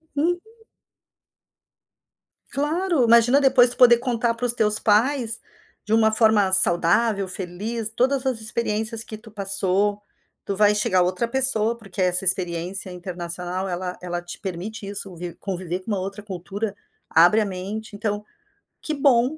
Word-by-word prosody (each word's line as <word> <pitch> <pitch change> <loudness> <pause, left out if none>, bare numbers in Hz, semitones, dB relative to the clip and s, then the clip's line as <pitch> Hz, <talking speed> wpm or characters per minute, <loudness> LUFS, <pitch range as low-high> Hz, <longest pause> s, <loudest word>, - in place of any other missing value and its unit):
Uhum. 340 +5 0 2.1
Claro, 315 +1 0
imagina 235 +3 +4
depois, 260 -3 +5
tu 245 - 0
poder 240 -2 +6
contar 235 -2 -1
para 230 - -11
os 235 - +7
teus 215 -2 +1
pais, 230 +2 +1 0.5
de 210 - -2
uma 220 -1 +3
forma 220 -3 +2
saudável, 190 +3 +3
feliz, 205 +5 -4
todas 265 +2 0
as 255 -4 -2
experiências 220 0 -3
que 215 -2 -10
tu 220 0 -15
passou. 200 0 0 0.4
Tu 200 - -3
vai 210 +1 +3
chegar 185 -3 +2
outra 185 +6 -2
pessoa, 235 -3 +6
porque 200 -4 -7
essa 180 +1 +2
experiência 180 +1 +1
internacional, 180 +1 -5
ela 180 0 -4
ela 175 -1 -4
te 175 0 -10
permite 200 +3 -7
isso, 195 -2 -6
vi 175 0 -8
conviver 185 -2 -5
com 200 - -7
uma 200 - -1
outra 195 +2 -7
cultura, 200 +2 -6 0.3
abre 175 +7 +4
a 215 - 0
mente. 200 +3 -7
Então, 205 0 -4 0.6
que 310 - -4
bom! 275 0 +2
210 Hz, 150 wpm, -22 LUFS, 185-235 Hz, 2.1 s, os